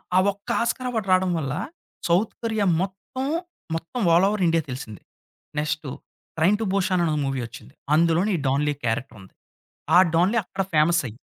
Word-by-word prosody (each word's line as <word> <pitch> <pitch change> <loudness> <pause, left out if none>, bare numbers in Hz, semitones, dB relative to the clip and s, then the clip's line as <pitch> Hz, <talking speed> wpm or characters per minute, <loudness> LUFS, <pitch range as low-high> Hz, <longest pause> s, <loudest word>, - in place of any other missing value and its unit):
ఆ - - +7
ఒక్క 200 0 -15
Oscar 250 +2 -1
award 220 -5 -2
రాడం 185 0 +4
వల్ల, 140 -3 -2 0.5
సౌత్ 180 +6 +2
కొరియా 220 -3 0 0.2
మొత్తం, 195 +8 -4 0.5
మొత్తం 165 +10 -5
ఆల్ 175 +3 +5
ఓవర్ 205 -3 -1
ఇండియా 165 0 +3
తెలిసింది. 125 -5 -7 0.6
నెక్స్టు 150 -1 -2 0.5
'ట్రైన్ 190 +6 +4
టూ - - 0
భూషన్' 185 -2 +1
అనే 155 -2 0
మూవీ 135 -2 -2
వచ్చింది. 115 - -13 0.2
అందులోని 170 +5 +3
ఈ - - -4
డాన్‌లీ 145 +2 +1
క్యారెక్టరుంది. 115 -4 -4 0.6
ఆ - - +9 0.2
డాన్‌లీ 190 +7 +3
అక్కడ 190 +1 -3
ఫేమస్ 160 +3 +4
అయ్యి 115 +1 -10
170 Hz, 160 wpm, -24 LUFS, 150-200 Hz, 0.6 s, ఆ